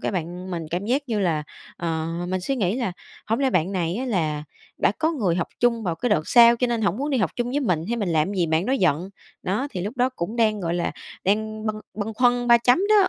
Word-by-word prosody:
cái - - -2
bạn 180 +1 -4
mình 170 -2 -3
cảm 180 +4 -2
giác 265 +5 +1
như 215 -3 0
là, 160 -5 +1 0.3
ờ, 160 -2 -2 0.2
mình 185 0 -1
suy 270 +9 -2
nghĩ 200 -1 0
là 235 -8 -1 0.3
hổng 225 +3 0
lẽ 270 -1 +2
bạn 180 -2 +1
này 175 0 -1
á 255 - -2
là 155 - -1 0.3
đã - - +3
có 320 +1 +1
người 200 - 0
học 175 - -1
chung 235 -2 +2
vào 175 -5 -1
cái 245 +9 -2
đợt 155 -6 +1
sau 235 -1 +7
cho 250 - +1
nên 235 -2 -1
hổng 200 -1 +1
muốn 285 +3 -2
đi 265 - +1
học 190 -8 +1
chung 240 0 -1
với 285 +3 0
mình, 180 - +1
hay 235 - 0
mình 205 -5 -1
làm 160 +3 +1
gì 175 -3 +1
bạn 160 +4 +1
đó 260 - +1
giận? 180 - +1 0.3
Đó, 210 +9 -1
thì 180 - -4
lúc 210 +8 -4
đó 250 +1 +3
cũng 220 -3 -5
đang, 215 -3 +2
gọi 170 -2 -1
là, 175 -1 -1 0.3
đang 215 +2 0
bâng 215 0 -2
bâng 215 +1 -4
khuâng 245 +1 +2
ba 235 - +8
chấm 245 +4 +4
đó. 415 -3 +5
210 Hz, 265 wpm, -24 LUFS, 175-245 Hz, 0.3 s, ba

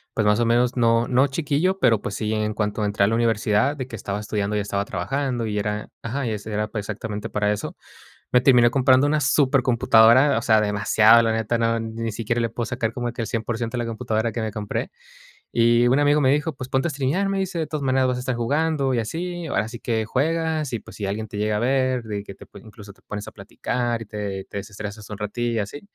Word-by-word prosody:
Pues, 110 - +1
más 105 +1 +3
o 120 - +2
menos, 120 +1 +2
no 115 0 +3
no 130 +2 +3
chiquillo, 155 +6 0
pero, 115 - +3
pues, 100 - -4
sí, 110 0 -2
en 110 0 -1
cuanto 105 0 -1
entré 105 -1 +1
a - - +4
la 110 - 0
universidad, 115 +3 +1
de 130 -2 -4
que 125 - -8
estaba 100 -1 -4
estudiando 105 0 -2
y - - +1
estaba 100 -1 -2
trabajando, 130 -1 -2
y 105 -1 -2
era 105 +1 -3
ajá. 135 +4 -3
Y 115 - -1
ese 105 0 -5
era 105 0 -1
pa 105 0 -5
exactamente 105 +1 -5
para 105 0 0
eso. 105 - -6 0.6
Me 125 - +5
terminé 125 -3 +5
comprando 130 +1 +4
una 150 +1 +1
supercomputadora. 130 -2 +4
O - - -7
sea, 110 -3 +4
demasiado, 105 +2 +5
la 115 - +1
neta. 115 +1 0
No 115 0 +1
ni 115 0 -4
siquiera 115 +2 -2
le 115 - 0
puedo 115 +2 -4
sacar 115 -2 -2
como 120 0 -3
que 120 - -5
el - - -4
100% 115 +1 -3
de 120 - -1
la - - -4
computadora 115 -1 -1
que 120 - -4
me 110 -1 -2
compré. 105 -2 -4 0.6
Y 120 +1 +4
un 130 +3 +3
amigo 145 +1 +3
me 130 -1 +4
dijo: 150 +2 0
"Pues 130 -1 -7
ponte 135 +4 +1
a - - -2
streamear". 145 +8 0
Me 195 0 -1
dice: 190 -2 -2
"De 160 - -2
todas 155 -2 -4
maneras 130 -1 +2
vas 125 - 0
a - - -4
estar 125 0 -2
jugando 140 +3 0
y 120 - +1
así. 170 +8 -4
Ahora 110 -7 -1
sí 120 0 -8
que 110 -2 -1
juegas, 155 +4 -1
y, 115 - -1
pues, - - -14
si 105 - -3
alguien 105 +3 -3
te 105 - -10
llega 105 0 0
a - - -1
ver, 130 0 +1
de 105 -2 -5
que 100 - -10
te - - -14
pue 100 - -14
incluso 105 -1 -13
te - - -28
pones 105 0 -6
a - - -8
platicar 120 +3 -3
y - - -6
te-te 100 -2 -5
desestresas 105 +1 -8
un 105 - -6
ratillo", 120 +3 -2
y - - +1
así. 105 +8 -5
115 Hz, 245 wpm, -23 LUFS, 105-130 Hz, 0.6 s, Me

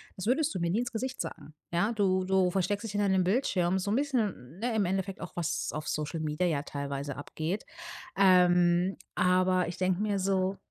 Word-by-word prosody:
„Das 190 +3 -5
würdest 300 +5 +2
du - - -3
mir 170 - 0
nie 205 +7 +1
ins 245 - -4
Gesicht 255 +3 -4
sagen.“ 150 -1 -6 0.2
Ja? 190 +6 +2
Du 185 -3 +2
du 185 -1 +2
versteckst 195 +3 0
dich 225 - -4
hinter 205 -1 +1
deinem 190 -1 +3
Bildschirm 190 -3 +1
so 200 - -3
'n 215 - +2
bisschen, 215 - -1
ne, 235 0 -1
im 205 -3 +2
Endeffekt 190 +1 -2
auch, - - -6
was 170 -3 -2
auf 155 0 -5
Social 155 +2 -2
Media 155 +3 -1
ja 155 -5 +1
teilweise 140 -1 -4
abgeht. 160 +7 -4 0.5
Ähm, 180 -1 +4 0.2
aber 185 0 +3
ich 175 +1 -6
denke 185 0 +1
mir 205 -2 0
so 190 0 0
185 Hz, 200 wpm, -29 LUFS, 175-205 Hz, 0.5 s, Ähm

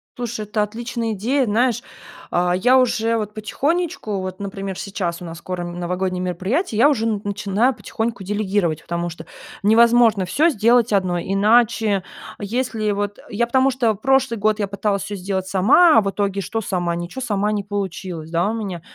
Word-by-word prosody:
Слушай, 240 -3 -4
это 210 0 0
отличная 230 +1 -3
идея, 250 +7 0
знаешь, 235 +2 +1 0.5
а 175 0 +2
я 245 +8 +4
уже 230 -3 +2
вот 210 -1 -4
потихонечку, 280 - -2
вот, 185 0 -6
например, 195 -1 -5
сейчас 180 -4 -4
у - - -7
нас 165 0 -7
скоро 180 +1 -5
н 175 0 -6
новогодние 180 +1 -2
мероприятия, 190 - -1
и - - -1
я 280 +5 +7
уже 235 -7 0
н 215 -3 -1
начинаю 210 +5 0
потихоньку 225 -2 -4
делегировать, 200 -5 -1
потому 170 0 -3
что 165 -1 -10 0.4
невозможно 230 -1 +5
всё 310 - +3
сделать 235 -1 +3
одной, 180 -3 +1
иначе, 210 -1 +3 0.4
если 220 0 -1
вот, 205 0 -2
э, - - -13
я 235 +3 0
потому 260 +2 +3
что 245 -4 +1
прошлый 260 +1 +1
год 215 +1 +1
я 205 - 0
пыталась 200 0 -1
всё 205 - -5
сделать 190 0 -3
сама. 235 - +5
А - - +7
в 200 - -1
итоге 200 -1 -1
что? 225 +4 -3
Сама 175 -4 -1
ничего, 175 +9 -6
сама 210 -4 0
не 205 -1 -1
получилось, 185 -5 -5
да, 170 +4 +1
у - - -2
меня. 200 -6 -4
210 Hz, 185 wpm, -21 LUFS, 190-235 Hz, 0.5 s, я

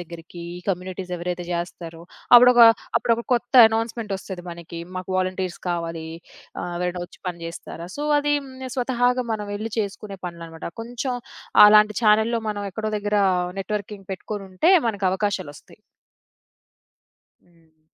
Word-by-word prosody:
దెగ్గరికి 170 0 -10 0.2
ఈ - - -11
కమ్యూనిటీస్ 185 0 -3
ఎవరైతే 175 0 -4
జెస్తారో, 170 -1 -5 0.3
అప్పుడొక 250 0 +7 0.4
అప్పుడొక 235 0 0
కొత్త 245 +2 -3 0.2
అనౌన్స్‌మెంటొస్తది 215 -5 -4
మనకి, 170 0 -8 0.2
"మాకు 185 +1 -6
వాలంటీర్స్ 185 -1 -2
కావాలి 165 -2 -3 0.6
ఆహ్, 175 - -4
ఎవరైనా 180 0 -2
వచ్చి - - -20
పని 170 -1 -6
జెస్తారా?" 170 0 -8
సో, 295 - -3
అది 290 0 +1 0.3
నేను 260 -2 -6
స్వతహాగా 250 0 +1
మనం 210 -1 -3
వెళ్లి 215 +1 -5
చేసుకునే 200 -1 -4
పనులనమాట. 165 -2 -9 0.2
కొంచెం 245 +2 -4 0.5
అలాంటి 210 -1 +6
చానెల్‌లో 220 +2 +3
మనం 205 -1 -3
ఎక్కడో 215 +2 -3
దెగ్గర 205 0 0 0.4
నెట్‌వర్కింగ్ 205 -1 -5
పెట్టుకొనుంటే 195 - -1 0.2
మనకవకాశాలొస్తాయి. 195 -6 -3 1.6
హ్మ్. 160 -2 -30
195 Hz, 120 wpm, -23 LUFS, 175-220 Hz, 1.6 s, అప్పుడొక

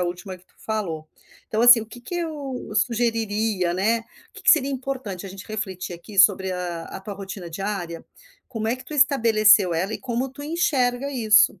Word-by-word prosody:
a - - +1
última 180 +2 -5
que 180 - -26
tu - - -33
falou. 175 -8 -3 0.4
Então 220 - -1
assim, 245 -1 +9
o - - -10
que 225 +3 -12
que 245 - -8
eu 295 -6 -5
sugeriria, 220 -5 0
né, 215 +5 +2 0.3
o - - -52
que - - -12
que - - +7
seria 280 -4 +4
importante 255 -8 -5
a - - -7
gente 195 +1 -10
refletir 190 -5 -5
aqui 190 +4 -10
sobre 190 -1 +5
a 175 -2 -4
a - - -8
tua 200 +1 -7
rotina 195 -3 -8
diária. 175 -2 -4 0.5
Como 225 -4 -4
é 235 - +1
que 255 - -13
tu 305 - -8
estabeleceu 220 - +5
ela 185 +6 -1
e - - -4
como 255 +1 -2
tu 280 +2 -10
enxerga 280 -5 0
isso. 215 -7 +4
215 Hz, 200 wpm, -23 LUFS, 190-250 Hz, 0.5 s, assim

